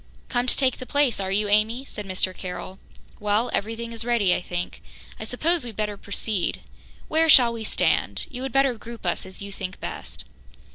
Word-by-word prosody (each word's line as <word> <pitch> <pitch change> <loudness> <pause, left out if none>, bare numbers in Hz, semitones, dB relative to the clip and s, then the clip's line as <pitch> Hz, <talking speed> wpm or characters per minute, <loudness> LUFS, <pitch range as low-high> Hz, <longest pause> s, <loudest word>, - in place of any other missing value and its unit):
"Come 245 0 +1
to - - +3
take 260 -2 +3
the 255 - -8
place, 285 -7 +2
are 190 -1 -2
you, 205 +2 +2
Amy?" 220 +5 +2
said 210 -6 -7
Mr. 185 0 -1
Carroll. 185 +1 -6 0.4
"Well, 210 +3 +1
everything 225 +2 -2
is 230 0 -2
ready, 230 -6 +3
I - - 0
think. 175 0 -4 0.4
I 220 - -5
suppose 320 +8 +1
we'd 235 -3 -6
better 210 -1 -1
proceed. 200 -1 -1 0.5
Where 320 +1 +3
shall 245 -5 +8
we 230 -1 -5
stand? - - +1
You 250 - -7
had 265 0 -3
better 270 0 +4
group 230 -2 -9
us 175 +1 -1
as 190 +1 -8
you 200 - -7
think 190 -1 -6
best." - - -7
220 Hz, 195 wpm, -25 LUFS, 200-250 Hz, 0.5 s, shall